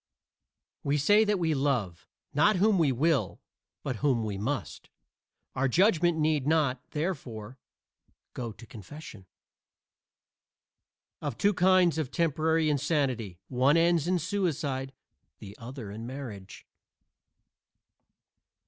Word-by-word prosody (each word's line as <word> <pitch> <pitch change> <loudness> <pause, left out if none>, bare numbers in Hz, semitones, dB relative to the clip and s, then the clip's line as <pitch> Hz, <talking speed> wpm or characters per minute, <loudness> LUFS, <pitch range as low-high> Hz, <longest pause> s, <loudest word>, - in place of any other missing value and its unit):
We 140 +1 +1
say 205 +9 +5
that 210 -1 +1
we 165 -3 +1
love, 120 - -1 0.3
not 200 +9 +4
whom 200 +1 +3
we 150 -5 +3
will, 135 - +1 0.4
but 130 -4 -3
whom 125 -4 +1
we 105 -2 -3
must. 115 +4 -4 0.7
Our 135 +1 +1
judgment 175 - +3
need 155 -3 +1
not, 145 -5 +2
therefore, 130 - -4 0.7
go 120 -3 -5
to 115 +3 -13
confession. 110 - -11 1.9
Of 115 - -4
two 205 +7 +3
kinds 180 -3 +4
of 150 -5 -2
temporary 160 +1 +1
insanity, 135 - 0
one 130 +4 +3
ends 170 -1 +3
in 180 0 +2
suicide, 150 -7 -2 0.5
the 100 0 -11
other 120 -3 -8
in 110 +3 -7
marriage. 120 -8 -8
145 Hz, 110 wpm, -28 LUFS, 120-165 Hz, 1.9 s, say